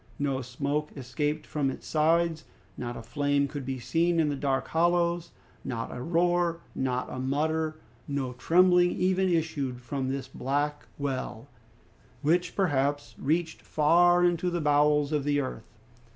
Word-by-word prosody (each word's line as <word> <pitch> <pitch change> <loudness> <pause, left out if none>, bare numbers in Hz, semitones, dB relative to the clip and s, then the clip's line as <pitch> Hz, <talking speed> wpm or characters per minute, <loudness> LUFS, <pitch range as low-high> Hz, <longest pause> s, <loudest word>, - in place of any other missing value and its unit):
No 135 -2 -1
smoke 140 +4 -2
escaped 145 +4 -2
from 145 -3 -1
its - - -7
sides; 160 +1 +1 0.3
not 120 -1 -5
a 115 - -8
flame 145 +3 +1
could 140 -2 -6
be 135 -1 -2
seen 165 +7 +1
in 155 -2 +3
the 145 - -1
dark 135 -1 -1
hollows; 170 0 +1 0.3
not 115 -2 -4
a 125 - -5
roar, 170 +2 +1
not 130 -1 -1
a 130 - -5
mutter, 155 +4 0 0.3
no 140 -3 -2
trembling 175 +6 +4
even 185 +1 +1
issued 155 -7 -1
from 130 +2 -3
this 135 0 -3
black 145 +3 -2
well, 135 -3 -4 0.7
which 175 +4 +1
perhaps 145 -6 0
reached 160 +3 -1
far 175 +3 +4
into 175 0 +1
the 175 0 -1
bowels 150 -1 +3
of 150 -2 0
the 145 0 +1
earth. 130 -5 -5
150 Hz, 150 wpm, -28 LUFS, 135-170 Hz, 0.7 s, trembling